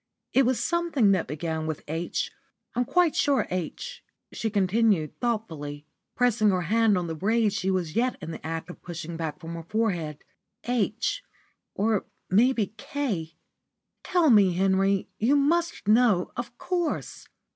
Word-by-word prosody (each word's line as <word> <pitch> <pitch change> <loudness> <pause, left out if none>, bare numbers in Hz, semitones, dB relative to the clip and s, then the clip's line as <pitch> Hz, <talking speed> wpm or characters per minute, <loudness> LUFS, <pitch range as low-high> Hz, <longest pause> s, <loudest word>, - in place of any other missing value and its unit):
It 265 -2 +5
was 255 -1 +1
something 335 -11 +2
that 185 -4 +1
began 160 +2 -3
with 160 -2 -4
'H,' 165 +3 -2 0.4
I'm 245 0 +1
quite 350 +3 +3
sure. 280 -3 +2
'H,'" 185 - -4 0.3
she 225 - -2
continued, 200 -4 +1
thoughtfully, 160 -12 -3 0.3
pressing 240 -4 +3
her 185 -2 +1
hand 220 +2 +3
on 180 - -1
the 165 - -3
braid 210 +5 +1
she 190 - -1
was 180 -5 -1
yet 250 +2 +2
in 160 - -6
the - - -8
act 165 +2 -4
of - - -14
pushing 170 -1 -6
back 160 -2 -4
from 165 +1 -7
her 165 - -5
forehead. 170 -6 -2 0.4
"'H,' 245 - -1 0.5
or 215 0 +1 0.3
maybe 220 0 +3
'K.' 205 - -3 0.7
Tell 345 -6 +3
me, 200 -5 +6
Henry. 195 +1 +2
You 245 +7 +3
must 330 -2 +1
know, 215 -4 +4
of 240 0 -6
course." 350 -4 -3
205 Hz, 150 wpm, -26 LUFS, 170-245 Hz, 0.7 s, me